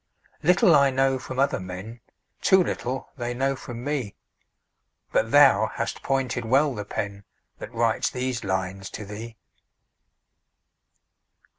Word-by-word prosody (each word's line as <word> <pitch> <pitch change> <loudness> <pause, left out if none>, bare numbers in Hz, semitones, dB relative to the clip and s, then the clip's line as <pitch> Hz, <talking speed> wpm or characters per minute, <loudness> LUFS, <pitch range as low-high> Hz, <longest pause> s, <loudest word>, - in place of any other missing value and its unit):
Little 180 +4 +5
I 140 -1 +5
know 135 0 +1
from 130 - -7
other 135 -5 +2
men, 95 +6 -8 0.4
Too 190 -1 +5
little 130 -5 -4
they 120 -1 -3
know 135 +2 0
from 120 -2 -8
me, 140 -7 -3 1.0
But - - +1
thou - - +6
hast - - -3
pointed 130 -3 -1
well 135 +5 +3
the 105 -3 -5
pen 100 0 -4 0.4
That - - -8
writes 115 -1 +1
these 125 -2 -3
lines 95 0 -3
to 105 - -7
thee. 110 +3 -8
120 Hz, 130 wpm, -25 LUFS, 105-135 Hz, 1.0 s, thou